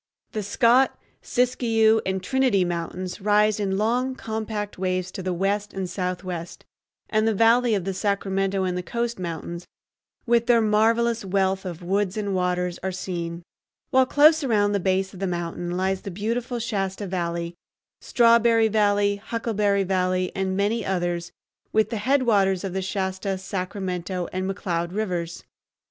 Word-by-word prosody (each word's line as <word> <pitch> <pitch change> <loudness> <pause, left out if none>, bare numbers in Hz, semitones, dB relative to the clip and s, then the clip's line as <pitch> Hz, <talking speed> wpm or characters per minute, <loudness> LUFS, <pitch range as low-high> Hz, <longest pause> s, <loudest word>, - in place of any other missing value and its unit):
The 215 - -3
Scott, 235 +6 +3 0.2
Siskiyou, 225 -3 +2
and 190 0 -1
Trinity 255 -6 +2
Mountains 175 +2 -4
rise 210 +1 +3
in 195 -2 0
long, 245 +5 0
compact 220 -4 -4
waves 185 -1 -1
to - - -6
the 185 0 -2
west 200 +3 -1
and 190 -1 -2
southwest, 180 -2 -5 0.4
and 215 0 +1
the 220 - +2
valley 230 +2 +4
of 195 - -1
the 195 - -1
Sacramento 195 -1 0
and 180 -1 -1
the 180 - -2
coast 235 +3 -3
mountains, 170 0 -5 0.6
with 235 -1 +2
their 240 -1 +5
marvelous 225 +2 +2
wealth 190 0 0
of 175 -2 -6
woods 195 +2 0
and 205 -2 -2
waters, 180 -1 -1
are 190 - -2
seen; 170 -2 -5 0.5
while 260 0 +4
close 305 +3 +5
around 210 -5 +2
the 200 - +1
base 190 +1 0
of 185 - -10
the 195 - -1
mountain 175 0 -3
lie 190 +1 +1
the 190 +1 -6
beautiful 230 +6 -2
Shasta 205 -4 -2
Valley, 170 -2 -3 0.5
Strawberry 230 -1 +4
Valley, 205 -1 +2
Huckleberry 210 -2 0
Valley, 185 -1 0
and 190 0 -1
many 210 +3 +1
others, 175 -2 -2 0.4
with 220 +2 +2
the 230 - -1
headwaters 210 -6 +2
of 190 -2 -4
the 190 - -1
Shasta, 190 0 -2
Sacramento, 185 -1 -4
and 185 +1 -2
McCloud 175 -2 -2
Rivers. 175 -5 -3
195 Hz, 155 wpm, -24 LUFS, 185-220 Hz, 0.6 s, their